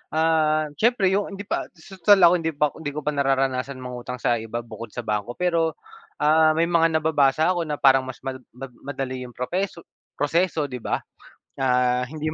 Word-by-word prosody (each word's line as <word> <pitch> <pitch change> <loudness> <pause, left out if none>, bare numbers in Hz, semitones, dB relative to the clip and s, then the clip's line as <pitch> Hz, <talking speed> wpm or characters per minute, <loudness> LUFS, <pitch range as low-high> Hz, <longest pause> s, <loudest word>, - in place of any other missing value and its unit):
ah, 155 -1 +2
siyempre 220 -5 +3
'yong 200 0 -1
hindi 200 - -7
pa - - -3
'di - - -37
su 190 -1 -13
tal 195 +1 +6
ako 175 +1 +6
hindi 160 -1 -3
pa 150 0 +2
ko - - -15
hindi 145 -2 -5
ko 150 - -4
pa 150 - 0
nararanasan 135 -1 0
mangutang 125 0 -6
sa 120 -1 0
iba 115 +1 -5
bukod 115 -1 -10
sa 120 - -4
bangko. 105 +2 -3
Pero, 165 -3 0 0.5
ah, 155 +1 +5
may 165 - +2
mga 165 -1 +3
nababasa 155 +1 +3
ako 170 -3 -2
na 150 - -2
parang 135 -2 +4
mas 130 - -9
ma 135 - -2 0.2
ma 130 +1 -8
madali 130 -2 -5
'yong 120 - -15
propeso 175 +6 -3 0.3
proseso, 165 +2 +1
'di 130 -3 -5
ba, - - -2 0.6
ah, 125 -1 +2
hindi 155 0 -4
150 Hz, 200 wpm, -24 LUFS, 130-165 Hz, 0.6 s, tal